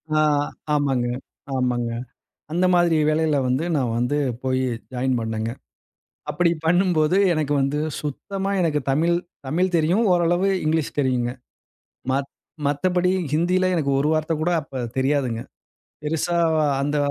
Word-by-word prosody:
ஆ, - - +4 0.5
ஆமாங்க, 135 -4 +1 0.5
ஆமாங்க. 125 -2 0 0.6
அந்த 175 +3 +1
மாதிரி 175 -2 +4
வேலையில 155 -1 +2
வந்து 130 +6 +1
நான் 125 -4 0
வந்து 125 +4 0 0.3
போய் 130 0 +1 0.3
ஜாயின் 130 0 0
பண்ணேங்க. 110 0 -2 0.8
அப்பிடி 175 -1 +2 0.2
பண்ணும்போது 175 -1 +3 0.2
எனக்கு 155 -3 0
வந்து 140 +2 0 0.2
சுத்தமா 195 +7 -4
எனக்கு 155 -4 +1
தமிழ் 165 +5 +2 0.3
தமிழ் 180 +5 0
தெரியும். 175 +8 +2
ஓரளவு 175 +2 +2 0.2
இங்கிலீஷ் 155 0 0
தெரியுங்க. 125 -3 0 0.8
மத் 135 +1 -1 0.4
மத்தபடி 180 +5 +1 0.2
ஹிந்தியில 180 +4 +2
எனக்கு 145 -4 0
ஒரு 145 - +1
வார்த்த 155 +1 0
கூட 175 +2 +1
அப்ப 135 -3 -6
தெரியாதுங்க. 130 -4 0 0.6
பெருசா 165 +3 0 0.2
வ - - +2 0.2
அந்த 145 +1 0
150 Hz, 125 wpm, -23 LUFS, 130-170 Hz, 0.8 s, ஆ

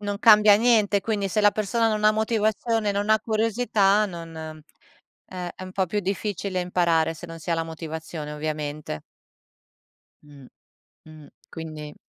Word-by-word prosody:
non 205 -1 -3
cambia 210 -2 +7
niente, 215 -3 +3
quindi, 205 -3 -1
se 215 - 0
la 205 - +6
persona 215 +3 0
non 215 -1 -1
ha 215 - +7
motivazione, 220 0 0
non 205 +2 -1
ha 220 0 +4
curiosità, 215 -2 +2
non 170 -3 -9 0.9
eh, 180 -1 -6
è - - -10
un 185 - -8
po' 190 0 +1
più 205 +4 -1
difficile 195 -1 -3
imparare, 170 -2 +1
se 170 +2 -10
non 165 0 -9
si 160 +2 -6
ha - - +3
la 165 - -1
motivazione, 160 -1 -7
ovviamente. 150 - -4 1.2
Mh, 145 -3 -15 0.6
mh. 155 -2 -13 0.2
Quindi 155 -2 -8
195 Hz, 155 wpm, -24 LUFS, 160-215 Hz, 1.2 s, cambia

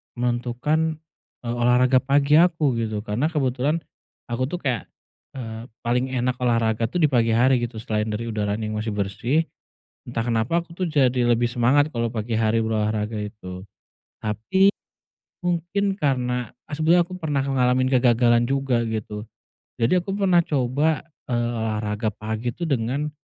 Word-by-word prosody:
menentukan, 125 +6 0 0.5
eee, 120 - -3
olahraga 125 +2 +4
pagi 140 +3 +4
aku, 165 -5 +3
gitu, 110 -2 -2
karena 115 +7 0
kebetulan 145 +1 0 0.5
aku 130 +2 0
tuh 175 +5 -5
kayak, 125 -5 -1 0.5
eee, 115 -2 -6 0.2
paling 125 +2 +1
enak 125 0 0
olahraga 115 -2 +1
tuh 175 +6 -1
di 150 - +4
pagi 115 -3 +3
hari, 125 +2 +4
gitu, 120 -1 -4
selain 110 -1 -2
dari 110 +1 -3
udaranya 105 0 -2
yang 110 0 -3
masih 110 -1 -3
bersih, 115 +10 0 0.7
entah 115 -1 -2
kenapa 120 +9 0
aku 170 - -16
tuh 180 +1 -2
jadi 130 -5 +2
lebih 120 0 +2
semangat 135 +5 +3
kalau 115 -1 -1
pagi 115 0 -4
hari 110 0 +2
berolahraga 110 0 -1
itu. 105 -3 -7 0.6
Tapi 190 - +2 0.7
mungkin 180 +3 0
karena, 125 -4 0 0.2
eee, - - -10
sebenernya 165 +3 +3
aku 185 - -10
pernah 150 -7 -1
ngalamin 130 -1 +2
kegagalan 120 -1 +4
juga, 135 -3 +1
gitu. 105 -1 -4 0.6
Jadi 120 +11 +4
aku 185 +2 -2
pernah 190 -3 +3
coba, 145 +3 +1 0.3
eee, 120 -1 0
olahraga 110 0 -1
pagi 110 +3 -4
tuh, 170 +3 -4
dengan 135 +3 0
125 Hz, 150 wpm, -23 LUFS, 110-145 Hz, 0.7 s, olahraga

